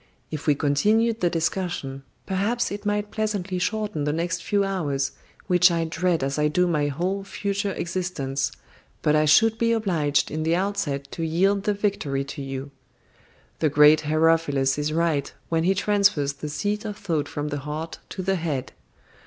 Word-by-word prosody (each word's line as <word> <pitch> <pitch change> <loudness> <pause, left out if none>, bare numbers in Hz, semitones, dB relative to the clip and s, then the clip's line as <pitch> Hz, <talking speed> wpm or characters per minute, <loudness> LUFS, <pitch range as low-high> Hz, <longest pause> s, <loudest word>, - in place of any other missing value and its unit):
If 155 -1 -5
we 145 - +5
continued 215 +11 +2
the 175 - +3
discussion, 165 -5 -2 0.2
perhaps 215 +6 0
it 205 +1 -5
might 205 0 -1
pleasantly 200 -4 -2
shorten 210 -5 -1
the 150 - +1
next 170 +2 -2
few 200 +2 +1
hours, 150 -9 -1 0.3
which 180 -1 +5
I 170 -1 0
dread 170 -1 0
as 140 +2 -1
I 150 - +3
do 180 +4 +2
my 150 -4 +1
whole 180 +7 -2
future 200 0 -2
existence, 170 -7 -2 0.5
but 150 - +3
I 155 0 +4
should 220 +9 +5
be 230 0 +2
obliged 165 -10 +1
in 155 +2 -2
the 165 +2 +2
outset 160 -8 -1
to 165 - -4
yield 195 +5 +1
the 210 - +1
victory 195 -10 -1
to 140 +1 -7
you. 135 0 -5 0.9
The 155 - +2
great 150 +2 +6
Herophilus 155 -3 +2
is 150 +1 -1
right 160 -3 0 0.2
when 165 0 +1
he 190 +2 +3
transfers 195 -8 +2
the 150 +2 -6
seat 205 +7 -2
of 210 -2 -5
thought 165 -9 -1
from 145 0 -4
the 145 - -3
heart 150 +3 -5
to 185 - -5
the 190 +1 +1
head. 155 -6 -3
165 Hz, 175 wpm, -24 LUFS, 150-200 Hz, 0.9 s, great